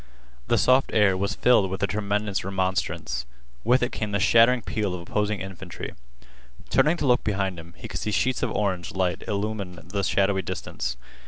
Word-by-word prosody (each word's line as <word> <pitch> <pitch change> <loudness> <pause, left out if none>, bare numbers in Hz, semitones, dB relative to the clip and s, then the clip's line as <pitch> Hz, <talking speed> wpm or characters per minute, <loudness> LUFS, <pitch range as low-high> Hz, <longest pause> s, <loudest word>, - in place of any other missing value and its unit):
The - - +3
soft 130 +1 +4
air 105 -3 +4
was 100 +2 -1
filled 115 -6 +4
with 95 - -4
the - - +4
tremendous 100 +1 -1
remonstrance. 95 -7 -2 0.4
With 125 +3 +3
it 125 - 0
came 105 -2 -3
the 100 - +2
shattering 115 +4 +5
peal 105 -5 -2
of 90 - -6
opposing 105 +3 -1
infantry. 95 -2 -7 0.8
Turning 160 +3 +4
to - - -2
look 125 -2 +3
behind 95 -4 -1
him, 85 +1 -13
he - - -8
could - - -5
see - - -2
sheets 125 +4 +1
of - - 0
orange 95 -5 -1
light 90 -2 0
illumine 100 -3 -3
the 100 +1 -1
shadowy 95 0 +2
distance. 65 -7 -4
100 Hz, 180 wpm, -25 LUFS, 95-110 Hz, 0.8 s, shattering